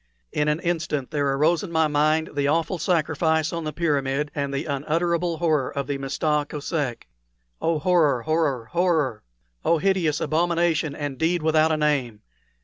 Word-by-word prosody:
In 150 - 0
an 150 +1 +1
instant 155 -6 -2
there 145 -2 0
arose 155 +5 +2
in 195 - -7
my 160 -1 +3
mind 155 +2 +1
the 140 -1 0
awful 165 +4 0
sacrifice 160 -1 +1
on 165 -1 -3
the 155 - -2
pyramid 145 -3 -1
and 140 -2 -2
the 140 0 -3
unutterable 165 +4 -1
horror 155 -6 +1
of 140 -1 -3
the 140 -1 -3
Mista 150 +2 0
Kosek. 145 -4 -3 0.5
Oh, 165 -1 +1
horror, 150 -6 +2
horror, 155 -7 0
horror! 160 -10 +1 0.4
Oh, 170 - +3
hideous 175 -4 +1
abomination 165 -2 +1
and 145 -3 -5
deed 165 0 +1
without 160 0 +3
a 155 - +1
name! 140 -8 0
155 Hz, 160 wpm, -24 LUFS, 145-165 Hz, 0.5 s, my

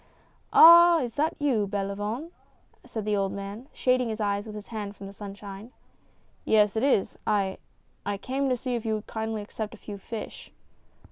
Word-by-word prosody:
"Ah! 340 0 +9
is 240 -3 -3
that 305 +2 0
you, 255 -9 +1
Belavoine?" 205 - -3 0.5
said 220 -2 -6
the 210 -1 +1
old 195 -1 0
man, 200 +5 -7
shading 250 -2 +1
his 220 0 -4
eyes 205 0 -1
with 215 - -8
his 210 -1 -9
hand 205 -3 -5
from 200 - -10
the 195 - -9
sunshine. 200 +2 -9 0.7
"Yes, 210 -1 +3
it 220 - +1
is 260 -7 +1
I. 195 -3 0 0.4
I 205 0 -2
came 265 +6 -2
to 250 - +1
see 250 +1 -3
if 235 -2 -2
you 220 -2 0
would 215 0 -6
kindly 220 -1 -4
accept 215 +1 -6
a - - -16
few 205 -1 -8
fish." 220 +2 -8
215 Hz, 185 wpm, -27 LUFS, 200-245 Hz, 0.7 s, Ah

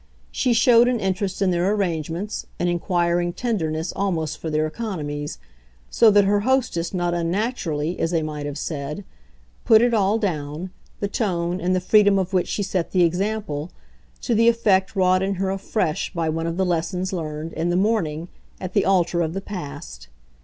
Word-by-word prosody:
She 250 -2 +1
showed 235 +1 +5
an 250 -2 +1
interest 195 0 -1
in 185 - +2
their 175 +3 +1
arrangements, 180 0 -2
an 175 - 0
inquiring 175 0 0
tenderness 165 -8 -2
almost 160 -6 -1
for 160 - -4
their 155 0 +1
economies; 155 -6 -4 0.5
so 230 - +6
that 205 -1 +5
her 205 +1 +2
hostess 235 -7 0
not 175 -2 -1
unnaturally, 175 - -1
as 165 - +1
they 165 -2 0
might 150 -1 -4
have 145 0 -5
said, 150 +4 -4 0.6
put 220 -3 +6
it 240 +1 +2
all 205 0 +3
down 165 -3 -3 0.3
the 200 - 0
tone 180 -4 -1
and 185 +1 +1
the - - +2
freedom 205 +2 +4
of 190 0 -1
which 180 -1 +2
she 205 - -2
set 185 -3 -2
the 180 -2 +4
example 180 -3 -1 0.5
to - - 0
the 230 +1 +4
effect 215 -5 +3
wrought 185 -1 +3
in 195 +1 0
her 190 +1 -1
afresh 195 -3 -1
by 165 -1 0
one 165 +1 -2
of 165 +1 -3
the 190 - +2
lessons 180 +2 -1
learned, 155 -2 -4
in 165 +2 -1
the 175 - +1
morning, 175 -6 0 0.3
at 185 -1 -6
the 200 - +2
altar 175 -2 +2
of 165 +1 -2
the - - -1
past. 150 - -8
180 Hz, 180 wpm, -23 LUFS, 165-205 Hz, 0.6 s, so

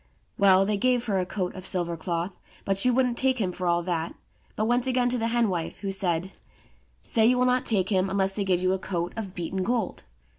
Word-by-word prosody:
Well, 195 -1 +5
they 205 0 0
gave 245 +2 +1
her 200 -4 0
a 180 - -2
coat 185 -2 -3
of 185 - -9
silver 175 -2 0
cloth, 170 +2 -3 0.3
but 195 - +1
she 195 +6 +2
wouldn't 250 -1 +1
take 260 -1 +1
him 190 -4 0
for 180 0 -4
all 170 0 +2
that, 170 -2 -2 0.4
but 215 - 0
went 245 +2 +2
again 250 -1 +2
to 250 - 0
the 225 - 0
hen 235 0 +2
wife, 170 -4 -3
who 200 -1 -2
said, 185 -1 -1 0.7
"Say 225 0 +3
you 250 +1 +4
will 250 - +3
not 250 0 +1
take 195 -4 +1
him 190 -2 +1
unless 195 0 0
they 200 - -1
give 185 -2 +1
you 185 0 +3
a 190 - -1
coat 175 -2 -3
of 200 -4 -6
beaten 180 +2 -3
gold." 225 0 -1
195 Hz, 235 wpm, -26 LUFS, 180-235 Hz, 0.7 s, Well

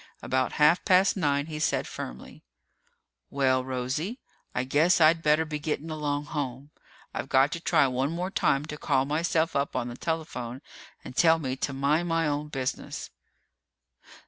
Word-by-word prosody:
About 130 -1 0
half 150 +4 +4
past 190 0 +4
nine, 145 -6 +1
he 155 -1 -6
said 155 - +1
firmly, 65 - -8 0.9
"Well, 130 -2 +2
Rosie, 130 - -3 0.4
I 125 - +1
guess 155 +8 +3
I'd 165 +1 +5
better 155 +1 +3
be 150 -1 -4
getting 155 +1 -3
along 145 -1 -2
home. 140 -2 -5 0.4
I've - - -4
got 135 +2 +4
to 170 - -3
try 155 - +3
one 130 +1 0
more 180 +3 -3
time 140 -6 +1
to 150 -1 -7
call 135 -3 +1
myself 160 +2 0
up 140 0 -1
on 125 -1 -1
the 120 - -7
telephone 135 -5 -4 0.4
and 125 - -9
tell 165 +1 +5
me 130 -5 -3
to 140 - -2
mind 145 +5 +1
my 165 -1 +1
own 145 0 -2
business." 135 -3 -4
150 Hz, 165 wpm, -27 LUFS, 130-160 Hz, 0.9 s, I'd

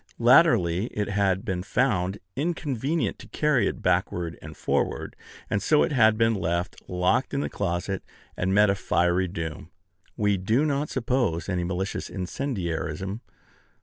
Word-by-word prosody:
Latterly 115 - +5
it 105 -4 -3
had 100 -2 +1
been 95 -2 -2
found 100 -3 0 0.2
inconvenient 150 0 -1
to - - -11
carry 140 -9 +2
it - - -4
backward 85 -2 0
and - - -10
forward; - - -1 0.3
and 100 - 0
so 150 -1 +4
it - - -1
had 110 -5 +4
been 115 0 +3
left, 85 -2 -2
locked 90 +10 +1
in 140 - 0
a - - -2
closet, 95 0 -2 0.3
and 90 +1 -1
met 105 +1 +5
a - - +2
fiery 90 -1 +1
doom. 80 -3 -6 0.5
We 105 -1 +2
do 110 +10 +1
not 145 0 0
suppose 115 -10 0
any 90 -2 -1
malicious 95 +2 -3
incendiarism. 95 - -3
100 Hz, 150 wpm, -26 LUFS, 90-125 Hz, 0.5 s, Latterly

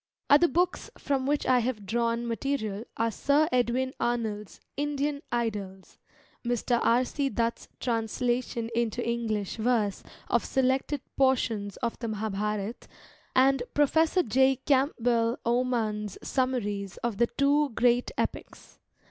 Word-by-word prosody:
Other 295 +4 +7
books 355 +5 0
from 270 -2 -1
which 290 +1 +1
I 255 -1 +4
have 230 -4 -2
drawn 235 +3 0
material 230 -3 -2
are 230 0 +1
Sir 285 +7 +2
Edwin 255 +1 +1
Arnold's 220 -4 -2 0.2
Indian 290 0 -1
Idylls, 205 -5 -3 0.4
Mr. 240 0 0
R. 245 +2 +3
C. 280 +1 -1
Dutt's 230 0 -2
translation 235 0 -1
into 235 0 -1
English 225 -4 -2
verse 220 -3 +1 0.3
of 235 - +2
selected 265 +2 0 0.2
portions 230 -7 +1
of 235 - -2
the 235 - -3
Mahabharata, 210 0 -3 0.5
and 265 0 +4
Professor 320 +5 +3
J. 265 +3 +3
Camp 270 +2 +2
bell 235 0 +2
Oman's 230 -4 0
summaries 210 -7 -1
of 235 -4 -1
the 235 - +3
two 285 +2 +2
great 245 +1 +3
epics. - - -5
240 Hz, 125 wpm, -28 LUFS, 220-265 Hz, 0.5 s, Other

